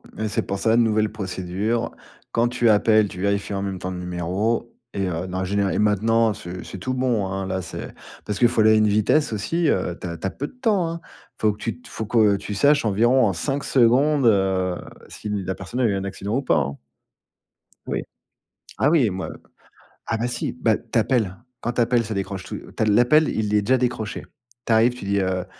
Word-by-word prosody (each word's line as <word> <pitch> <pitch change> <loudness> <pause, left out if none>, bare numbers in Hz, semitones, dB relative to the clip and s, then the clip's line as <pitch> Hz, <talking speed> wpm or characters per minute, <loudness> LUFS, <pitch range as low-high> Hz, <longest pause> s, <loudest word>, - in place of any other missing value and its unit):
Mais 110 - -2
c'est 115 +2 0
pour 100 0 -3
ça, 115 +2 +3
nouvelle 110 -2 +2
procédure, 95 +4 -2 0.4
quand 115 +1 +2
tu 120 -1 +2
appelles, 110 0 +4
tu 90 - -9
vérifies 100 +1 0
en 100 - -2
même 95 -2 -3
temps 90 - -4
le 90 - -5
numéro 90 +7 -2 0.2
et 95 -1 -1
heu, 90 +1 -3
dans 90 0 -4
la 95 - -1
généra 100 0 0
et - - -1
maintenant, 110 +2 +3
c'est 90 0 -8
c'est - - -8
tout 130 +8 -3
bon, 125 -6 0
hein, 95 0 -3
là, 95 0 -2
c'est - - -7 0.3
parce 105 - -3
qu'il 120 - +6
faut 115 -2 +1
aller 110 - +6
à - - +6
une 110 0 +4
vitesse 110 +6 +2
aussi, 160 - 0
heu, 90 -2 0
tu - - -5
as 85 -1 -5
tu 80 - -7
as - - -1
peu 140 +9 -5
de - - -16
temps, 220 -9 +1
hein, 165 0 -5
Il - - -21
faut 105 -1 +4
que - - -14
tu 115 +3 -5
te - - -15
il - - -14
faut 110 - -4
que 110 -2 +4
tu 105 - -6
saches 145 +6 +3
environ 115 +1 +3
5 135 - -2
secondes, 135 +3 +3
heu, 95 -4 +2 0.3
si 105 - -7
la 95 -2 -2
personne 95 +8 -6
a - - +3
eu 105 - +2
un 95 - -2
accident 100 +3 -3
ou - - 0
pas, 105 - +2
hein 70 -1 -1 1.1
oui. - - -2 0.8
Ah 145 - +3
oui, 150 -8 +4
moi 95 0 -4 0.8
ah 115 - 0
bah 115 +2 -1
si, 125 - -2
bah, 115 -3 +1
tu 115 0 -1
appelles. 110 -6 0 0.2
Quand 120 - -2
tu 120 - +1
appelles, 120 0 +2
ça 110 0 -4
décroche 95 -1 -4
tou - - -6
tu - - -4
as - - +2
l'appel, 120 +9 +4
il 105 -1 -1
est 105 - +4
déjà 130 +6 +2
décroché. 120 -4 -2 0.4
Tu 115 - +2
arrives, 115 +2 +4
tu 125 - -9
dis, 100 0 +1
heu: 95 -1 -1
105 Hz, 230 wpm, -23 LUFS, 95-120 Hz, 1.1 s, qu'il